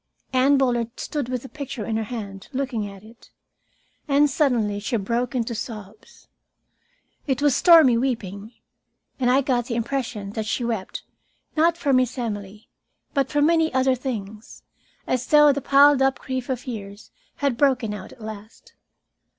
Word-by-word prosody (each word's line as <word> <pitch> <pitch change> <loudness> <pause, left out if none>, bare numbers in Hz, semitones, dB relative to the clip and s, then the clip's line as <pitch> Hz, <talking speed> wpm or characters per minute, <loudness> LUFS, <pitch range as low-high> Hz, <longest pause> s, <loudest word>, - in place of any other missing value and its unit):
Anne 265 +2 +4
Bullard 240 -3 0
stood 285 -5 -3
with 250 -2 -3
the - - -8
picture 275 -7 -6
in 225 - -2
her 220 - 0
hand, 200 -4 -7
looking 255 -6 -2
at 195 0 -13
it. 225 +2 -17 0.8
And 285 0 +3
suddenly 235 -8 +1
she 215 +3 -1
broke 235 +5 -2
into 235 -1 -1
sobs. 215 -2 -9 1.0
It 265 -2 0
was 285 -2 +3
stormy 315 -9 +6
weeping, 220 -5 -3 0.7
and 250 -2 +2
I 260 +2 +4
got 250 -3 0
the 235 - -3
impression 230 -4 -3
that 215 0 -4
she 240 - -1
wept, 225 -5 -4 0.5
not 335 +2 +3
for 285 -5 0
Miss 255 -1 +2
Emily, 210 -3 -5 0.5
but 275 -2 +1
for 290 -1 +1
many 325 0 +3
other 260 0 +3
things 220 -5 -6 0.4
as 255 -1 -1
though 295 -1 +6
the 280 - -3
piled 280 +1 +5
up 270 0 +2
grief 260 0 -5
of 255 -2 -3
years 205 -4 -8 0.2
had 280 -4 0
broken 255 -5 +1
out 205 -3 -8
at - - -16
last. 215 0 -10
245 Hz, 160 wpm, -23 LUFS, 220-275 Hz, 1.0 s, stormy